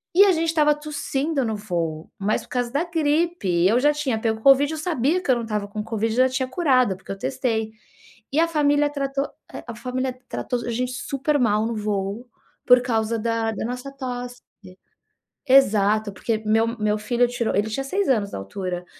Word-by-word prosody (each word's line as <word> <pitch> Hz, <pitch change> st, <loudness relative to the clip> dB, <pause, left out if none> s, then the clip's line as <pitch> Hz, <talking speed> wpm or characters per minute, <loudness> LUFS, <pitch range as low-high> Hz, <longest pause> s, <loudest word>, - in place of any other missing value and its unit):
E 400 Hz, -, +8 dB
a 390 Hz, -, +5 dB
gente 330 Hz, -1 st, 0 dB
estava 300 Hz, -2 st, +3 dB
tossindo 290 Hz, -1 st, -2 dB
no 220 Hz, -1 st, -1 dB
voo, 170 Hz, -6 st, -3 dB
mas 205 Hz, +2 st, 0 dB
por -, -, -17 dB
causa 245 Hz, -1 st, -2 dB
da 290 Hz, +5 st, 0 dB
gripe, 305 Hz, -, +1 dB
eu 230 Hz, +5 st, +3 dB
já 295 Hz, +2 st, +3 dB
tinha 270 Hz, -7 st, -1 dB
pego 220 Hz, -1 st, -1 dB
covid 275 Hz, +3 st, +5 dB
eu 310 Hz, -, -4 dB
sabia 315 Hz, +1 st, 0 dB
que 315 Hz, -, -8 dB
eu 255 Hz, -, +6 dB
não 235 Hz, -, -3 dB
estava 210 Hz, -2 st, -3 dB
com 210 Hz, +1 st, -5 dB
covid 225 Hz, 0 st, -2 dB
e -, -, -4 dB
já 260 Hz, 0 st, +5 dB
tinha 260 Hz, 0 st, -1 dB
curado, 255 Hz, -, +2 dB
porque 190 Hz, -, -10 dB
eu 195 Hz, -, -5 dB
testei. 225 Hz, -2 st, -2 dB, 0.6 s
E 295 Hz, -, +1 dB
a 335 Hz, -, +4 dB
família 295 Hz, -2 st, +2 dB
tratou 275 Hz, -1 st, -2 dB, 0.4 s
a 235 Hz, -, -6 dB
família 255 Hz, +2 st, -3 dB
tratou 245 Hz, -2 st, -3 dB
a -, -, -3 dB
gente 250 Hz, +2 st, -2 dB
super 275 Hz, +3 st, -1 dB
mal 215 Hz, -3 st, +2 dB
no 235 Hz, -, -3 dB
voo, 210 Hz, +2 st, -3 dB, 0.4 s
por 250 Hz, 0 st, +7 dB
causa 225 Hz, -2 st, -1 dB
da 230 Hz, 0 st, 0 dB
da 215 Hz, -, -4 dB
nossa 250 Hz, +3 st, -5 dB
tosse. 245 Hz, -2 st, -6 dB, 1.1 s
Exato, 215 Hz, -5 st, +4 dB
porque 225 Hz, +2 st, -1 dB
meu 225 Hz, +2 st, +2 dB
meu 210 Hz, 0 st, +1 dB
filho 240 Hz, +3 st, +1 dB
tirou 240 Hz, -2 st, -2 dB
ele 210 Hz, +2 st, +1 dB
tinha 270 Hz, +5 st, -2 dB
6 390 Hz, +8 st, -1 dB
anos 210 Hz, -6 st, +1 dB
na -, -, -3 dB
altura, 180 Hz, -, -5 dB
245 Hz, 200 wpm, -23 LUFS, 215-280 Hz, 1.1 s, E